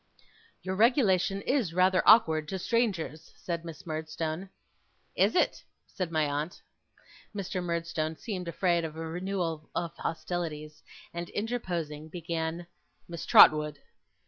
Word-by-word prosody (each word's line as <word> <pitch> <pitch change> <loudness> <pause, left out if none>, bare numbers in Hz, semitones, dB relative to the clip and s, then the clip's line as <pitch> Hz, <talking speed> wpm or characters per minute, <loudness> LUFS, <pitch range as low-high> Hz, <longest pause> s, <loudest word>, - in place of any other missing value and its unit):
'Your 185 0 -2
regulation 200 -4 +3
is 235 - 0
rather 185 0 +4
awkward 160 -9 +6
to 190 - -3
strangers,' 190 -7 -1
said 170 -2 -4
Miss 165 -2 -9
Murdstone. 160 +3 -4 0.7
'Is - - +3
it!' - - +2 0.2
said 180 -3 -4
my 155 -2 +2
aunt. 150 +4 -3 0.8
Mr. 190 -2 -3
Murdstone 170 -2 -2
seemed 185 -6 -5
afraid 170 0 +1
of 160 -1 -5
a 165 0 -5
renewal 170 -2 -3
of 170 -2 -2
hostilities, 155 -3 -4 0.3
and 170 0 -5
interposing 175 -9 -3
began: 165 0 -3 0.4
'Miss 170 -1 -7
Trotwood! 150 -1 +7
170 Hz, 120 wpm, -29 LUFS, 160-185 Hz, 0.8 s, Trotwood